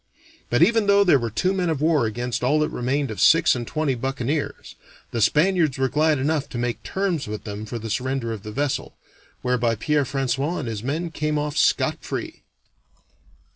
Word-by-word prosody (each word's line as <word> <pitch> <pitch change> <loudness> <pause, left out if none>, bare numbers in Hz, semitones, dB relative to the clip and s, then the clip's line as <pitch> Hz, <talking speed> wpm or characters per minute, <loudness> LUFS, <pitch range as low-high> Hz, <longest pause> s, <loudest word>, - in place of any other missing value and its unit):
But - - +4
even 225 -3 +3
though 200 0 +6
there 175 -8 +5
were 115 -1 -2
two 180 - 0
men 180 -3 0
of 155 -4 -1
war 150 -6 +2
against 120 +2 -3
all 140 +5 +3
that 150 - +1
remained 135 0 -1
of 100 -4 -5
six 165 +7 +6
and 120 -2 -4
twenty 155 -3 0
buccaneers, 135 +3 -3 0.4
the 115 - -2
Spaniards 155 - +3
were 130 0 +1
glad 155 +1 +2
enough 145 +2 -1
to 125 - -6
make 120 0 -2
terms 190 - -2
with 105 0 -5
them 105 0 -6
for 120 - -4
the 115 0 -6
surrender 125 0 -2
of 110 - -7
the 105 +1 -8
vessel, 140 +3 -2 0.5
whereby 125 -2 +1
Pierre 150 +6 +1
François 135 +5 -1
and - - -4
his 110 -3 -4
men 160 +7 -3
came 150 -1 -1
off 150 0 -2
scot - - +2
free. - - -5
135 Hz, 195 wpm, -23 LUFS, 120-155 Hz, 0.5 s, though